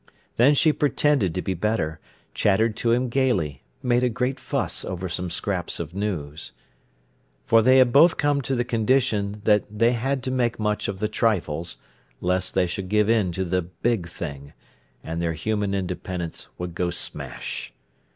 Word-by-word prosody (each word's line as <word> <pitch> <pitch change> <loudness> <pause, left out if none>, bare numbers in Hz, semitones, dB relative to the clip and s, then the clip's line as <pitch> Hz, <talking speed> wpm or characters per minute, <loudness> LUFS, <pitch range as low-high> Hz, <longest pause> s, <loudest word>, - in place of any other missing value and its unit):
Then 135 +5 +6
she 155 +2 +4
pretended 145 - +1
to 90 - -2
be 95 - -1
better, 85 -4 -1 0.3
chattered 110 +2 +2
to 115 - +1
him 125 +2 +2
gaily, 115 - 0 0.2
made 125 0 +2
a 125 - +3
great 125 +3 -2
fuss - - -2
over 95 0 -4
some 90 +1 -3
scraps 90 0 -3
of 85 -1 -5
news. 85 -7 -4 0.9
For 115 0 +5
they 130 +3 +5
had 125 -2 +5
both 165 +4 +6
come 145 -1 +2
to 135 +1 -2
the 120 -1 0
condition 110 -4 +1
when 105 -2 +4
they 115 +3 +2
had 130 +2 -1
to 130 - -2
make 120 -2 0
much 105 -1 0
of 100 - -3
the 105 - +2
trifles, 85 -8 0 0.4
lest 90 +1 0
they 90 - +3
should 90 +2 -4
give 105 +1 +3
in 105 -6 +2
to 95 +2 -2
the 90 +1 0
big 90 +3 -2
thing, 70 -5 -7 0.5
and 80 +1 -4
their 85 -1 0
human 105 +3 -1
independence 90 -2 -4
would 90 -1 -5
go 90 0 -1
smash. 85 - -3
105 Hz, 170 wpm, -24 LUFS, 90-120 Hz, 0.9 s, Then